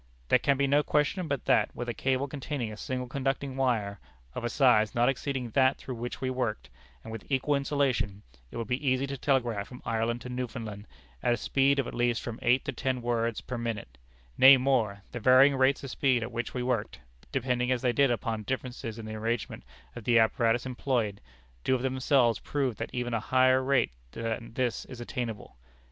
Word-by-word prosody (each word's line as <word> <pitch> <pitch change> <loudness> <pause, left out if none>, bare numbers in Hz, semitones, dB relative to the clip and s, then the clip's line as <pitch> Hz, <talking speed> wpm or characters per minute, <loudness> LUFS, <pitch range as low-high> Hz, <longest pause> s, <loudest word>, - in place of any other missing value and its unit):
"There 125 - +5
can 140 +2 +2
be 140 - +2
no 140 +2 +4
question 150 +5 0
but 140 -3 -2
that, - - +2
with 120 - -5
a 120 - -2
cable 130 +4 0
containing 135 -5 -4
a - - -7
single 125 +3 -4
conducting 135 +1 -2
wire, 110 -7 0 0.3
of - - -5
a 120 - -1
size 120 -5 +3
not 120 +2 +4
exceeding 135 -3 -3
that 130 +2 +3
through 130 - -7
which 120 +1 -5
we 130 -1 -1
worked, 115 - -3 0.3
and - - -8
with 110 -3 -7
equal 135 +2 +1
insulation, 140 -8 0 0.3
it - - -8
would 115 - -2
be 125 +5 -2
easy 130 +1 +2
to 140 0 -4
telegraph 120 -7 0
from 125 - -11
Ireland 115 +1 -1
to 125 - -7
Newfoundland 115 -4 -5 0.3
at 120 - +2
a - - -7
speed 140 +2 +2
of 135 - +1
at - - -6
least 120 -1 0
from 115 -1 -6
eight 125 +2 +3
to - - -1
ten 130 -2 -2
words 115 -2 0
per 125 -2 -5
minute; 105 - -5 0.4
nay, 135 +1 +10
more: 120 -7 0
the 120 - -5
varying 130 +4 +6
rates 135 +1 +2
of 135 - -5
speed 130 -4 +2
at 115 - -5
which 120 +1 -4
we 125 - -1
worked, 125 -4 -2 0.3
depending 125 -1 0
as 125 -2 0
they 125 -1 +2
did 140 0 +4
upon 115 -2 -1
differences 120 -1 -4
in 115 - -7
the 110 - -6
arrangement 115 +1 -3 0.3
of 120 - -7
the 120 -1 +4
apparatus 115 +1 +2
employed, 120 -5 -1 0.4
do 130 - +2
of 125 - -3
themselves 130 -2 +2
prove 135 -5 -1
that - - -4
even 125 -1 -3
a 115 - +1
higher 130 +3 +3
rate 135 - +2 0.2
than 115 0 -4
this 125 -3 -1
is 130 -2 -10
attainable. 120 - -5
125 Hz, 205 wpm, -29 LUFS, 115-135 Hz, 0.4 s, nay